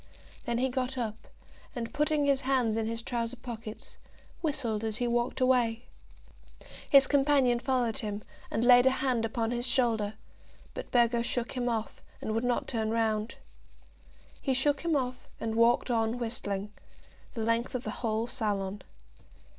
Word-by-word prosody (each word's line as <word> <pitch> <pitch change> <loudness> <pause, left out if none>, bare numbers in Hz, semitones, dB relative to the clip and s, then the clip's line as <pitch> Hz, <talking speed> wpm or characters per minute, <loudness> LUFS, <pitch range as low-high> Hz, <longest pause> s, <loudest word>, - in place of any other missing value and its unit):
Then 235 -2 0
he 255 +2 +2
got 260 0 -2
up, 225 -3 -4 0.5
and, 230 -2 -4
putting 300 0 +1
his 275 -1 +2
hands 255 -5 +1
in 225 -1 -1
his 230 0 -3
trousers 235 0 -2
pockets, 225 -3 -8 0.4
whistled 250 -9 -1
as 220 -1 -2
he 245 -1 0
walked 240 +2 0
away. 245 -3 +2 1.1
His 275 -2 +8
companion 270 -3 +3
followed 250 -2 0
him, 210 -3 -4 0.3
and 225 - -1
laid 245 +1 +7
a 260 0 +2
hand 245 -4 +1
upon 225 0 -1
his 240 +1 -1
shoulder; 225 -5 +1 0.6
but - - -6
Burgo 235 -1 +3
shook 240 0 -1
him 245 -1 -1
off, 225 -2 -3 0.2
and 215 - -3
would 225 +2 0
not 245 -1 0
turn 220 -3 -1
round. 220 -1 0 1.1
He 265 -2 +1
shook 280 +2 +2
him 335 -2 +1
off, 255 -2 -2
and 225 -1 -2
walked 235 +2 +3
on 225 0 +1
whistling, 210 -4 -4 0.6
the 225 - -2
length 230 +3 0
of 250 - -2
the - - -3
whole 225 -1 0
salon. 205 -4 -2
235 Hz, 160 wpm, -30 LUFS, 225-255 Hz, 1.1 s, His